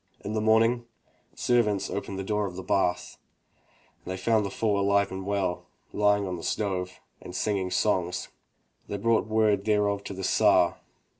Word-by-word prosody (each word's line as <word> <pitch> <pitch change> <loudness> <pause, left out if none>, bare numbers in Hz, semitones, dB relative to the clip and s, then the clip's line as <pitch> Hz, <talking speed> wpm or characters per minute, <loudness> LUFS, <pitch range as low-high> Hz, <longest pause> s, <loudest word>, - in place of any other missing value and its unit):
In 105 - -5
the 110 - 0
morning 115 +2 +3 0.5
servants 105 -5 +1
opened 100 -1 -4
the 95 - -3
door 105 +1 -1
of 90 - -8
the 95 - -6
bath 90 -1 -1 0.8
and - - -6
they 95 - -3
found 110 +2 +2
the 100 - -3
fool 105 0 0
alive 100 0 +2
and 95 0 -6
well, 100 -3 -1 0.3
lying 105 -1 +2
on 90 -2 -4
the 85 - -9
stove, 95 -3 -2 0.2
and 90 - -9
singing 95 -2 -1
songs. 90 -1 0 0.6
They 100 - -4
brought 115 +2 +1
word 110 -2 +2
thereof 105 -2 +1
to 100 - -6
the 95 - -6
Tsar. - - +3
100 Hz, 170 wpm, -27 LUFS, 95-105 Hz, 0.8 s, morning